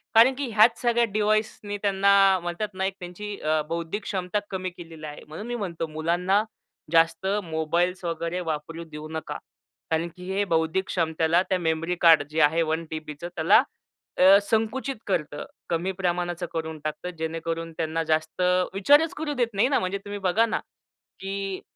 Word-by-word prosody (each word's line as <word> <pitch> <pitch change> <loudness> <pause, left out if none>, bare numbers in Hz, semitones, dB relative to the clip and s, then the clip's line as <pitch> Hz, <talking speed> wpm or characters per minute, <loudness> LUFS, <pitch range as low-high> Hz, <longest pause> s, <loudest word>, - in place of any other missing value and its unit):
कारण 235 +4 +7
की 280 -1 -2
ह्याच 225 +2 +5
सगळ्या 240 -1 +3
डिव्हाइसनी 215 -1 0
त्यांना 195 -1 +4
म्हणतात 175 +5 -3
नाही 190 +1 -1
का, - - -30
त्यांची 195 +4 -6
अ, 155 0 +1
बौद्धिक 170 +5 -3
क्षमता 190 +1 -2
कमी 185 -1 -3
केलेली 165 -3 -11
आहे. 150 - -9
म्हणून 160 +9 -7
मी 240 - -3
म्हणतो, 170 -7 -3
मुलांना 175 +6 +1 0.5
जास्त 165 +2 +3 0.2
मोबाईल्स 170 +3 -1
वगैरे 170 +1 -2
वापरू 160 +2 -5
देऊ 150 0 -7
नका. 160 0 -4 0.5
कारण 160 +1 +1
की 180 +1 -6
हे 200 +1 +1
बौद्धिक 165 +1 +1
क्षमतेला 165 0 +1
त्या 185 - +2
मेमरी 165 +1 0
कार्ड 165 -3 +7
जे 155 +1 -2
आहे 150 +3 +4
1 160 0 0
टीबीचं 155 +1 -6
त्याला 180 +9 +5 0.5
अ, 190 +2 +8
संकुचित 225 +6 -1
करतं. 150 -6 -2 0.3
कमी 170 +3 0
प्रमाणाचं 175 -1 -2
करून 160 -1 -4
टाकतं. 155 +3 -4
जेणेकरून 165 +1 -3
त्यांना 165 0 -1
जास्त 155 +2 -1 0.3
विचारच 290 - +4
करू 305 -1 -2
देत 245 -4 +1
नाही 205 +5 +3
ना. 280 - +3
म्हणजे 185 +1 -2
तुम्ही 205 0 -5
बघा 195 +4 +3
ना, 225 - -1 0.6
की 195 0 -4
175 Hz, 165 wpm, -25 LUFS, 160-200 Hz, 0.6 s, अ